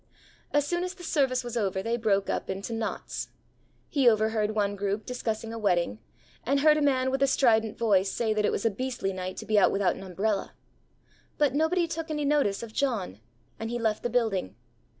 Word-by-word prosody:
As 290 -1 +2
soon 345 +4 -1
as 365 +1 -4
the 360 - -12
service 265 -6 +1
was 240 -1 -6
over 195 -4 -1
they 230 +1 0
broke 205 -4 +1
up - - -2
into 195 +4 -4
knots. 225 -1 -4 0.6
He 270 -4 +4
overheard 215 -1 +1
one 205 -1 +1
group 200 +1 -2
discussing 225 -2 -3
a 230 - -5
wedding; 175 - +1 0.4
and 275 +3 +1
heard 305 0 +6
a - - 0
man 260 -2 +2
with 270 0 -1
a 275 - +5
strident 225 -5 +3
voice 200 -4 +2
say 225 -2 0
that 215 0 0
it - - +2
was 200 - -2
a 225 - +3
beastly 245 -3 -3
night 185 0 -5
to - - -6
be 215 -1 +3
out - - +5
without 195 -2 +1
an - - -9
umbrella. 195 +2 -2 0.8
But 290 -3 +2
nobody 325 +4 +2
took 325 0 -5
any 300 -1 -1
notice 280 -9 +1
of 225 -2 -8
John, 220 - -1 0.4
and 225 - -4
he 240 - -2
left 220 -2 0
the 240 - -1
building. 220 - 0
225 Hz, 210 wpm, -28 LUFS, 200-270 Hz, 0.8 s, heard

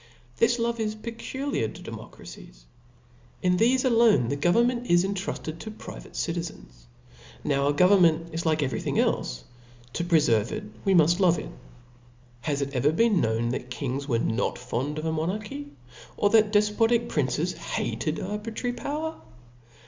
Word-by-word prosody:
This 235 +1 +3
love 235 0 -1
is 215 -1 -1
peculiar 230 - -3
to - - -10
democracies. - - -11 0.8
!n 180 0 +3
thefe 255 +3 +3
alone 225 - +4
the 140 - 0
government 235 - +2
is 175 0 +5
intruded 190 -4 -4
to 220 - -7
private 215 - -10
citi 165 0 -2
zens. - - -9 0.6
Now 140 +1 +2
government 170 0 +4
is 165 +1 -2
like 155 -2 +1
every 130 - -2
thing - - -2
clfe: 60 0 0 0.5
to 170 - -1
prefer 150 - +3
ve 115 - -5
it, - - -5 0.2
we 195 - +4
muft 170 +2 +4
love 175 -3 +4
it. - - -6 0.9
Has 140 +3 -1
it 140 0 -6
ever 140 +3 +2
been 210 +2 +3
heard 115 +1 0
that 125 0 -4
kings 135 +2 -3
Were 120 -5 +1
not 115 +1 -1
fond 125 +4 -3
of 155 - -4
monarchy, 210 - -3 0.5
or 205 - +2
that 215 -2 +5
defpotic 225 +3 +3
princes - - 0
hated - - -3
aibi* 210 +2 -5
trary 245 +1 -2
power 305 +6 -4
175 Hz, 155 wpm, -26 LUFS, 140-225 Hz, 0.9 s, is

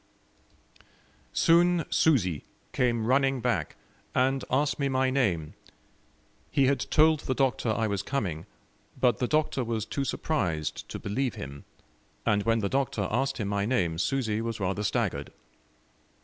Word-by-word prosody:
Soon 170 0 +4
Susi 95 - +2 0.3
came 120 -3 +1
running 135 +2 +2
back, - - -1 0.4
and 130 +1 +2
asked 135 0 +1
me 140 -1 +1
my 130 0 +1
name; 90 - 0 1.0
he 140 - +3
had 135 0 +2
told 155 0 +5
the 130 - -2
Doctor 130 -3 +1
I 110 +1 +1
was 100 -3 -1
coming, 95 - -3 0.5
but 125 -2 +3
the 125 - +1
Doctor 150 -3 +1
was 115 -2 -2
too 140 +5 -2
surprised 90 - -2
to - - -5
believe 120 +5 -2
him, 70 +1 -8 0.6
and 105 -1 +3
when 115 +1 +1
the 100 - 0
Doctor 130 -7 0
asked 135 +5 0
him 105 -5 -2
my 100 0 0
name, 85 -10 0
Susi 110 0 0
was 115 -1 -3
rather 95 +1 -1
staggered. 100 -1 -1
120 Hz, 145 wpm, -28 LUFS, 100-135 Hz, 1.0 s, told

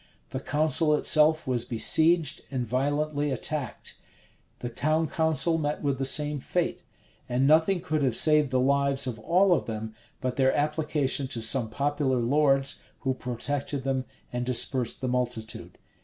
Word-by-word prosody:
The - - -3
council 155 +1 +2
itself 155 +1 +3
was 125 -2 -1
besieged 160 +7 +1
and 130 -3 -3
violently 145 +4 -1
attacked: 135 0 -4 0.6
the 120 - -5
town 155 +7 0
council 160 +1 +1
met 150 0 -3
with 140 -2 -1
the 135 - -1
same 145 +2 +2
fate: - - -2 0.5
and 125 +2 +1
nothing 160 +5 +3
could 155 -2 -2
have 130 -4 +1
saved 150 -1 +3
the 130 -1 +1
lives 140 +1 +1
of 120 -4 -5
all 180 - +3
of - - -1
them, 110 -1 -5 0.3
but 125 -1 -3
their 135 -1 +2
application 150 -2 0
to 120 -4 -4
some 115 0 0
popular 140 +1 0
lords, 135 +2 +2 0.2
who 130 -1 0
protected 130 +3 -3
them, 130 -1 -1 0.3
and 125 0 -2
dispersed 125 0 +1
the 130 - -2
multitude. 120 -3 -3
140 Hz, 155 wpm, -27 LUFS, 125-150 Hz, 0.6 s, itself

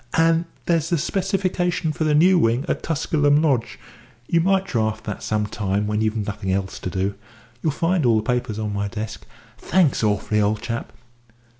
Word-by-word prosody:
And 165 +1 +3 0.2
there's 165 -2 +1
the 170 - +2
specification 180 -1 0
for 155 - -1
the 150 -1 +3
new 180 +4 +5
wing 120 +2 +2
at - - -1
Tusculum 145 -2 +2
Lodge 140 -7 0 0.5
you 170 - +3
might 190 +2 +2
draft 110 - -1
that 105 - -5
some 105 -1 -1
time 100 -1 -1
when 105 +1 -1
you've 110 0 0
nothing 100 -2 -3
else 95 0 -2
to - - -4
do. 95 +3 -1 0.5
You'll 155 - +1
find 165 +3 0
all 115 -3 +4
the 110 - 0
papers 120 -2 -1
on 105 -1 -3
my 100 0 -1
desk. 110 +1 -6 0.3
Thanks 170 -11 +2
awfully, 105 0 +1
old 105 +1 0
chap." 115 0 -4
120 Hz, 180 wpm, -22 LUFS, 105-165 Hz, 0.5 s, new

